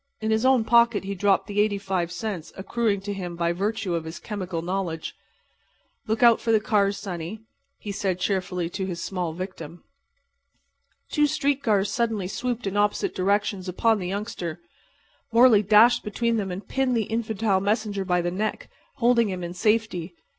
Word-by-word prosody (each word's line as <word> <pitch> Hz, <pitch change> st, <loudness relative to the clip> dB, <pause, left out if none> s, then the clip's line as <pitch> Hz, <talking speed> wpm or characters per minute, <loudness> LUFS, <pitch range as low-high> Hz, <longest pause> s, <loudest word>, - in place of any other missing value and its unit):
In 220 Hz, 0 st, -1 dB
his 220 Hz, +3 st, +2 dB
own 260 Hz, -3 st, +4 dB
pocket 235 Hz, -2 st, +4 dB
he 195 Hz, +1 st, -4 dB
dropped 200 Hz, 0 st, +2 dB
the 205 Hz, 0 st, 0 dB
85 195 Hz, -4 st, -1 dB
cents 180 Hz, -3 st, -5 dB
accruing 200 Hz, +1 st, -1 dB
to 205 Hz, +1 st, -4 dB
him 180 Hz, -3 st, -5 dB
by 170 Hz, 0 st, 0 dB
virtue 200 Hz, 0 st, -2 dB
of 165 Hz, -1 st, -1 dB
his 160 Hz, +1 st, -7 dB
chemical 185 Hz, -6 st, -5 dB
knowledge. 175 Hz, -3 st, -3 dB, 0.9 s
"Look 220 Hz, +2 st, 0 dB
out 235 Hz, -1 st, +6 dB
for 230 Hz, -, 0 dB
the 220 Hz, -, +5 dB
cars, 205 Hz, -2 st, +1 dB
sonny," 190 Hz, +1 st, -6 dB, 0.4 s
he 205 Hz, -, -6 dB
said, 195 Hz, -3 st, -1 dB
cheerfully, 180 Hz, -2 st, -1 dB
to 190 Hz, 0 st, -3 dB
his 175 Hz, -2 st, -4 dB
small 180 Hz, -2 st, -3 dB
victim. 170 Hz, -2 st, -8 dB, 1.3 s
Two 300 Hz, -1 st, +3 dB
street 280 Hz, 0 st, 0 dB
cars 205 Hz, -5 st, +1 dB
suddenly 220 Hz, -4 st, -1 dB
swooped 245 Hz, +4 st, -3 dB
in 195 Hz, 0 st, -2 dB
opposite 210 Hz, -, +1 dB
directions 200 Hz, 0 st, 0 dB
upon 220 Hz, +4 st, +2 dB
the 180 Hz, -, -4 dB
youngster. 185 Hz, -4 st, -4 dB, 0.7 s
Morley 230 Hz, -2 st, +6 dB
dashed 215 Hz, +4 st, +5 dB
between 230 Hz, +2 st, 0 dB
them 200 Hz, -3 st, -2 dB
and 185 Hz, +3 st, -6 dB
pinned 265 Hz, -2 st, 0 dB
the 225 Hz, -, +1 dB
infantile 220 Hz, -2 st, 0 dB
messenger 205 Hz, 0 st, -1 dB
by 180 Hz, -1 st, +1 dB
the 175 Hz, -, -1 dB
neck, 210 Hz, +4 st, -3 dB, 0.2 s
holding 235 Hz, -4 st, +3 dB
him 185 Hz, -2 st, -4 dB
in 175 Hz, 0 st, -5 dB
safety. 195 Hz, -4 st, 0 dB
200 Hz, 170 wpm, -25 LUFS, 185-225 Hz, 1.3 s, out